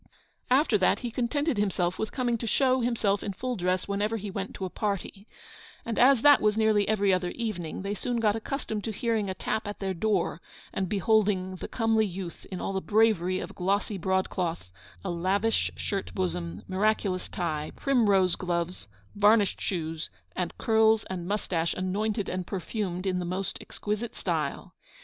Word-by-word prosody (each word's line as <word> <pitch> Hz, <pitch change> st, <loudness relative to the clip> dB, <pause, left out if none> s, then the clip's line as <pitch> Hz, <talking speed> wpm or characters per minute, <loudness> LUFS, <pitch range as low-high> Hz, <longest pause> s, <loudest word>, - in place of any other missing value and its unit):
After 255 Hz, -4 st, +4 dB
that 185 Hz, -, +3 dB
he 240 Hz, -2 st, -3 dB
contented 255 Hz, +2 st, 0 dB
himself 185 Hz, -3 st, 0 dB
with 220 Hz, -, -2 dB
coming 245 Hz, -3 st, 0 dB
to 230 Hz, -, -4 dB
show 260 Hz, +2 st, +3 dB
himself 220 Hz, -4 st, +1 dB
in 200 Hz, -, -3 dB
full 250 Hz, +6 st, -3 dB
dress 185 Hz, -1 st, 0 dB
whenever 205 Hz, +3 st, 0 dB
he 205 Hz, -1 st, -5 dB
went 195 Hz, 0 st, -4 dB
to 190 Hz, -, -3 dB
a -, -, -3 dB
party; 200 Hz, 0 st, -3 dB, 0.6 s
and, 230 Hz, -2 st, -2 dB
as 255 Hz, -1 st, +6 dB
that 290 Hz, -1 st, +8 dB
was 210 Hz, 0 st, +2 dB
nearly 215 Hz, -2 st, +3 dB
every 205 Hz, -2 st, +3 dB
other 180 Hz, -1 st, 0 dB
evening, 190 Hz, -7 st, -4 dB
they 200 Hz, +1 st, -2 dB
soon 240 Hz, +4 st, -2 dB
got 215 Hz, -2 st, +3 dB
accustomed 220 Hz, -2 st, -3 dB
to 225 Hz, -, -2 dB
hearing 220 Hz, -2 st, 0 dB
a 190 Hz, -, -3 dB
tap 220 Hz, +3 st, -2 dB
at 205 Hz, -, -5 dB
their 195 Hz, -1 st, -2 dB
door, 185 Hz, -3 st, 0 dB, 0.3 s
and 190 Hz, -2 st, -1 dB
beholding 195 Hz, -2 st, +2 dB
the -, -, -6 dB
comely 225 Hz, -2 st, +2 dB
youth 180 Hz, -2 st, -7 dB
in 185 Hz, -, -4 dB
all 195 Hz, -, -2 dB
the 190 Hz, -, -1 dB
bravery 205 Hz, -5 st, +3 dB
of -, -, -5 dB
glossy 195 Hz, +2 st, 0 dB
broadcloth, 180 Hz, -, -1 dB, 0.3 s
a 185 Hz, -, -1 dB
lavish 190 Hz, +6 st, +1 dB
shirt 195 Hz, -1 st, -3 dB
bosom, 175 Hz, -2 st, -2 dB
miraculous 195 Hz, -1 st, 0 dB
tie, 155 Hz, -4 st, -2 dB
primrose 200 Hz, -9 st, +3 dB
gloves, 175 Hz, -, -3 dB, 0.3 s
varnished 205 Hz, 0 st, +4 dB
shoes, 160 Hz, -3 st, -3 dB, 0.3 s
and 180 Hz, -, -3 dB
curls 220 Hz, -1 st, +4 dB
and 175 Hz, -2 st, -4 dB
moustache 180 Hz, -5 st, -1 dB
anointed 205 Hz, +3 st, -1 dB
and 185 Hz, -1 st, -3 dB
perfumed 190 Hz, -1 st, -3 dB
in 185 Hz, -1 st, 0 dB
the -, -, -2 dB
most 185 Hz, +2 st, -3 dB
exquisite 215 Hz, +2 st, -4 dB
style. -, -, -2 dB
200 Hz, 175 wpm, -28 LUFS, 185-220 Hz, 0.6 s, that